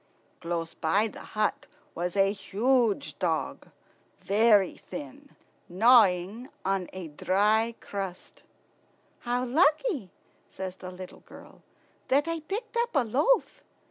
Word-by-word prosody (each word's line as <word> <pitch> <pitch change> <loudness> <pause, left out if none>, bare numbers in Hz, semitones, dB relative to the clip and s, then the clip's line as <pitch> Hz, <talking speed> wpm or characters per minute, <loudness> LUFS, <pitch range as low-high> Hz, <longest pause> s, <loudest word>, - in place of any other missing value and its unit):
Close 170 -1 -3
by 195 +7 +1
the 215 - -10 0.2
hut 215 -1 0 0.3
was 175 +2 -3
a 195 0 +4
huge 230 +5 0
dog, - - -2 0.5
very 205 -2 +3
thin, 285 0 -10 0.3
gnawing 210 +2 +4 0.2
a 185 -2 -2
dry 210 +8 +1
crust. 195 -3 -7 0.8
"How 245 +1 -1
lucky," 300 - +2 0.4
says 190 -1 -6
the 185 - -8
little 185 0 -10
girl, - - -15 0.5
"that 285 +4 +2
I 330 0 -2
picked 420 +10 -6
up 470 -4 0
a 275 - +4
loaf!" 290 - +1
215 Hz, 110 wpm, -28 LUFS, 185-270 Hz, 0.8 s, a